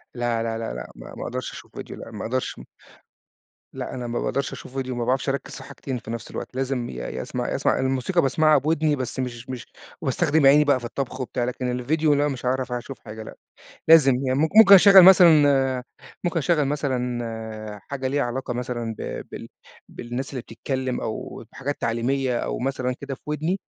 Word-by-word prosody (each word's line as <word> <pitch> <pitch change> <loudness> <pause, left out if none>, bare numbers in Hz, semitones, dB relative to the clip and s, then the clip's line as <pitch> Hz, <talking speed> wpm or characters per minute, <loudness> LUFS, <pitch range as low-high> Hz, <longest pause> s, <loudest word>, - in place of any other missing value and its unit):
لا، 120 -1 -1
لا، 115 -1 -2
لا، 115 - -4
لا، - - -7
ما - - -11
ما - - -6
أقدرش - - -4
أشوف - - -12
فيديو - - -7
لأ - - -9
ما - - -6
أقدرش. 130 - -3 1.1
لأ - - -5
أنا 125 -1 -5
ما 120 - -2
باقدرش 140 -1 -2
أشوف 130 - -10
فيديو 130 -2 -3
ما 120 -1 -2
باعرفش 130 +2 0
أركّز 140 - -3
في 135 - -9
حاجتين 130 -1 -6
في 115 - -8
نفْس 115 -1 -6
الوقت، - - -7
لازم 130 -2 -2
يا 60 -1 -6
يا 65 - -5
أسمع - - -4
يا - - -2
أسمع - - +1
الموسيقى 135 +7 +1
باسمعها 155 +3 +4
بوِدني 155 +1 +1
بس 130 -1 -5
مش 125 -1 -5
مش 125 -3 -6 0.4
وباستخدم 155 -2 +2
عيني 145 +2 +7
بَقى 140 -3 +3
في 120 - -8
الطبخ 130 +1 -4
وبتاع، 125 -1 -2
لكن 125 0 -2
الفيديو 150 +5 +1
لأ 145 +1 +2
مش 130 -3 -5
هاعرف 130 0 -1
أشوف 125 +2 -5
حاجة 110 0 -9
لأ، - - -10 0.5
لازم 155 -5 +8
يعني 130 +1 +1
ممك 160 +1 +2
ممكن 220 -3 +10
أشغّل 195 0 +9
مثلًا 145 -8 +6 0.4
ممكن 170 -1 0
أشغّل 155 -1 +2
مثلًا 120 -6 -3
حاجة 135 -2 -3
ليها 140 +1 0
علاقة 125 0 -3
مثلًا 120 -2 -3
ب - - -5
بال - - -8 0.4
بالناس 120 +3 -6
اللي 130 -3 -4
بتتكلّم 130 +2 -3
أو 110 +1 -5
بحاجات 140 +2 -4
تعليمية، 125 +2 0
أو - - -3
مثلًا 130 -1 -2
كده 140 -1 -5
في - - -21
وِدني، 155 +6 -1
130 Hz, 195 wpm, -24 LUFS, 120-145 Hz, 1.1 s, ممكن